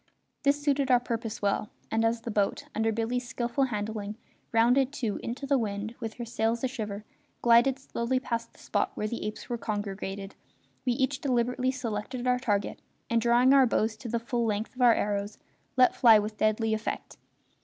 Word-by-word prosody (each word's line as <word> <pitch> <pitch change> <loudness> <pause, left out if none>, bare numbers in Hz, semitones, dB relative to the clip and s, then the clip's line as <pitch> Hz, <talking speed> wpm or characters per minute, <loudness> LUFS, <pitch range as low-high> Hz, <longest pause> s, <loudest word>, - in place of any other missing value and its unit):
This 285 +1 +3
suited 280 -2 +1
our 250 -1 +6
purpose 230 -3 -4
well, 200 +1 0 0.2
and 225 0 +2
as 225 0 +1
the 230 - -5
boat, 205 -1 0
under 225 +1 +1
Billy's 235 +3 -2
skilful 240 +3 0
handling, 210 -2 -4 0.3
rounding 245 +4 +4
to 235 -7 -3
into 245 +4 -5
the 275 -1 +2
wind, 210 0 -3
with 225 -1 -5
her 240 - -5
sails 230 +1 -1
a - - +3
shiver, 215 -5 -5 0.4
glided 240 +3 +5
slowly 255 -1 -1
past 230 -2 -3
the - - -24
spot - - -1
where 210 - -2
the 235 - -4
apes 215 - -7
were 240 -2 -3
congregated, 200 -2 -4 0.5
we 250 - +2
each 265 +2 0
deliberately 250 -1 +1
selected 245 0 -3
our 250 0 +2
target 205 -5 -1 0.3
and, 230 0 +3
drawing 240 +3 +5
our 270 -2 +6
bows 220 -1 +1
to 230 +2 -7
the 235 - 0
full 235 +1 -1
length 215 -1 -1
of 255 - -7
our 240 -2 +7
arrows, 205 0 -2 0.4
let 255 -1 +5
fly 230 -3 +7
with 210 +1 -2
deadly 215 +1 +1
effect. 220 0 -4
230 Hz, 185 wpm, -28 LUFS, 215-250 Hz, 0.5 s, our